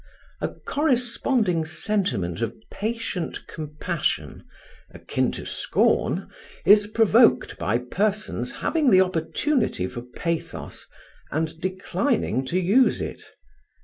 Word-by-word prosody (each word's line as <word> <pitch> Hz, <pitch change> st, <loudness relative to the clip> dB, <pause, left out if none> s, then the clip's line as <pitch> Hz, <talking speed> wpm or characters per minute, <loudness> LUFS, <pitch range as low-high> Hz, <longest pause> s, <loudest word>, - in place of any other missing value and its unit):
A -, -, +1 dB
corresponding 245 Hz, -, 0 dB
sentiment 155 Hz, -, -1 dB
of 115 Hz, 0 st, -2 dB, 0.2 s
patient 220 Hz, -5 st, -3 dB
compassion, 155 Hz, +2 st, -3 dB, 0.5 s
akin -, -, -1 dB
to -, -, -6 dB
scorn, -, -, +1 dB, 0.4 s
is 205 Hz, +3 st, +7 dB
provoked 225 Hz, +2 st, +4 dB
by 100 Hz, +7 st, +1 dB
persons 200 Hz, -, -1 dB
having 310 Hz, -5 st, +3 dB
the 185 Hz, -3 st, +7 dB
opportunity 185 Hz, -, 0 dB
for 120 Hz, +5 st, -6 dB
pathos, 160 Hz, +7 st, -5 dB, 0.4 s
and 160 Hz, +2 st, -2 dB
declining 185 Hz, -, -1 dB
to 180 Hz, +7 st, +1 dB
use 205 Hz, +9 st, +4 dB
it. -, -, -5 dB
185 Hz, 100 wpm, -24 LUFS, 155-225 Hz, 0.5 s, is